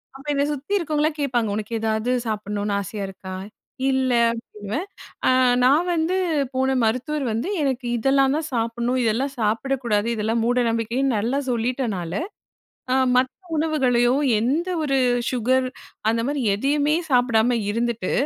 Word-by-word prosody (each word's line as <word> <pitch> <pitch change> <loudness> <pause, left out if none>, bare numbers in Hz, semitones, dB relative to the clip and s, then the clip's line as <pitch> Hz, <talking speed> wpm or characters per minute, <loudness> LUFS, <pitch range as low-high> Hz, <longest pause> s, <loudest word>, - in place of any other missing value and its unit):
அப்ப 275 +2 -12
இத 280 0 +1
சுத்தி 290 +8 -5
இருக்கவங்கலாம் 305 -2 0
கேட்பாங்க. 245 -5 0
உனக்கு 215 +1 -5
எதாவது 220 +2 0
சாப்பிட்ணுனு 205 -1 -2
ஆசையா 200 +1 -5
இருக்கா? 190 0 -9 0.6
இல்ல 260 -1 +1 0.2
அப்பிடின்னுவேன். 230 - -5 0.4
அ - - +5 0.3
நான் 290 +7 +4
வந்து 335 +3 0 0.4
போன 265 0 +1
மருத்துவர் 260 +6 0
வந்து 230 - -2
எனக்கு 260 -3 -1
இதெல்லாந்தான் 275 +5 +2
சாப்பிட்ணும். 235 +2 0
இதெல்லாம் 255 +5 0
சாப்பிடக்கூடாது. 230 0 0
இதெல்லாம் 220 +2 0
மூடநம்பிக்கைன்னு 240 +1 +1
நல்லா 240 +7 0
சொல்லிட்டனால, 230 -7 -1 0.8
அ - - +3 0.2
மத்த 255 +1 +3 0.3
உணவுகளையோ! 255 -6 +2 0.3
எந்த 295 +11 0
ஒரு 275 -2 +1 0.3
சுகர், 255 +1 +1 0.4
அந்தமாரி 245 +4 0
எதையுமே 290 +6 +1 0.2
சாப்பிடாம 245 -1 +3
இருந்துட்டு, 230 -3 -1
245 Hz, 120 wpm, -23 LUFS, 225-275 Hz, 0.8 s, அ